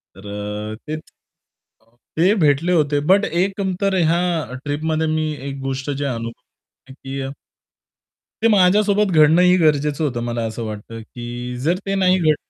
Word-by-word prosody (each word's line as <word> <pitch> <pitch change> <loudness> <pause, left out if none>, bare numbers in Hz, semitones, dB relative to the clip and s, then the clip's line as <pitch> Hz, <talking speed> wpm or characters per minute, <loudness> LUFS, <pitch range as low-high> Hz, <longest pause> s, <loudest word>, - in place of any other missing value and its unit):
तर 105 +2 -6
ते 155 - -3
अ, - - -4 1.2
ते 185 +5 +4
भेटले 150 +4 +3
होते. 145 -3 +2
बट 200 +1 +5
एक 190 +4 -1 0.2
तर 195 -1 +1
ह्या 165 -6 0
ट्रिपमध्ये 155 +2 -1
मी 155 0 0 0.2
एक 135 0 -6
गोष्ट 135 +1 -3
जे 140 +1 -3
अनुभव 115 -3 -4 0.5
आहे - - -10
की 135 0 -6 1.2
ते - - +6
माझ्यासोबत 205 +1 +3
घडणं 155 +2 +5
ही 180 0 +5
गरजेचं 150 -2 +2
होतं, 125 -5 -1
मला 120 -1 -2
असं 110 +1 -5
वाटतं, 110 +1 -7
की 120 +2 -7
जर 165 +7 +1
ते 195 0 -1
नाही 185 -1 +3
घडलं 155 -3 +3
150 Hz, 155 wpm, -20 LUFS, 125-175 Hz, 1.2 s, ते